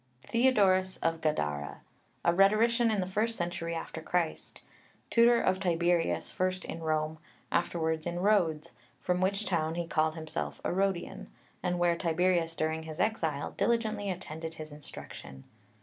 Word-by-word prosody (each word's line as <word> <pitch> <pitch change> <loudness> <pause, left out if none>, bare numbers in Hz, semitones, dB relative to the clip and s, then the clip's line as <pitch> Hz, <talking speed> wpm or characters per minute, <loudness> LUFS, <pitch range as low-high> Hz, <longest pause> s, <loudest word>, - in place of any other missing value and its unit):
THEODORUS 200 -7 +3
of 165 0 0
Gadara, 75 - -1 0.4
a 170 - +5
rhetorician 225 +5 +4
in 210 -3 +1
the - - -1
first 215 +5 0
century 175 -1 -3
after 165 0 -5
Christ; 170 0 -2 0.5
tutor 235 0 +6
of 185 0 +1
Tiberius, 175 -2 +1
first 185 0 -1
in 165 - -6
Rome, 155 0 -1 0.3
afterwards 160 -1 0
in 175 0 -2
Rhodes, 175 -6 +2 0.3
from 180 0 0
which 200 +3 +1
town 160 -3 0
he 170 0 -2
called 155 -1 +1
himself 160 -1 -4
a - - -1
Rhodian, 190 - -1 0.3
and 180 0 0
where 175 -1 +3
Tiberius 170 -1 +1
during 160 0 -1
his 160 +1 -8
exile 160 -10 0
diligently 220 -3 0
attended 165 -3 -5
his 155 -1 -8
instruction. 70 - -10
175 Hz, 145 wpm, -30 LUFS, 160-195 Hz, 0.5 s, tutor